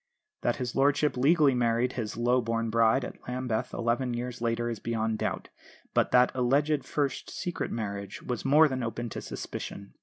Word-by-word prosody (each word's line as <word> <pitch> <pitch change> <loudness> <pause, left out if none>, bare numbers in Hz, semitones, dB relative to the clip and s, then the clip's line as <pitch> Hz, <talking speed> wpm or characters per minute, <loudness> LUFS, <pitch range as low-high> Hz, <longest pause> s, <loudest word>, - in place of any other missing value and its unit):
That - - +1
his 125 -3 -4
lordship 145 +2 +3
legally 145 +2 +4
married 120 0 +1
his 110 -4 -4
low 120 +2 +3
born 115 -1 -1
bride 115 +3 +3
at - - -9
Lambeth 125 -3 -2
eleven 120 +1 0
years 120 0 -5
later 115 0 0
is 115 -3 -3
beyond 110 -1 -1
doubt, - - -3 0.4
but - - +3
that 125 0 +5
alleged 140 +4 +2
first 145 -2 -2
secret 175 -2 -3
marriage 100 -3 -5
was 125 -3 -3
more 150 +4 +6
than 130 -2 -3
open 115 0 -3
to - - -6
suspicion. 100 0 -7
120 Hz, 175 wpm, -28 LUFS, 115-135 Hz, 0.4 s, more